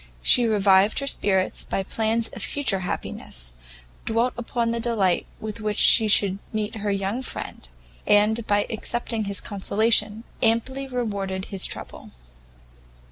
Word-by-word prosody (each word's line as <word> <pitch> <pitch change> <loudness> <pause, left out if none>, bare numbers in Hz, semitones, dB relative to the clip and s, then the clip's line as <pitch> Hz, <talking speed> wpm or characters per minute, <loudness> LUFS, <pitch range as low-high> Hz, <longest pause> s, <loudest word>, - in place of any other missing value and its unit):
She 240 -2 +5
revived 200 -1 +3
her 275 - 0
spirits 190 -8 0
by 195 - -2
plans 225 +3 0
of - - -8
future 270 -9 0
happiness, - - -5 0.5
dwelt 230 +3 +1
upon 235 -1 -2
the 235 - -2
delight 215 -6 +1
with 215 0 -6
which 210 -1 -2
she 225 -2 +6
should 200 -2 +3
meet 215 -1 -3
her 210 -1 -3
young 200 +4 -2
friend, 65 - -7 0.4
and, 215 +2 +3
by 205 0 +2
accepting 225 0 -2
his 200 -1 0
consolation, 215 +2 +1 0.2
amply 260 +4 0
rewarded 200 -7 -3
his 190 - +1
trouble. - - -7
215 Hz, 135 wpm, -24 LUFS, 195-230 Hz, 0.5 s, she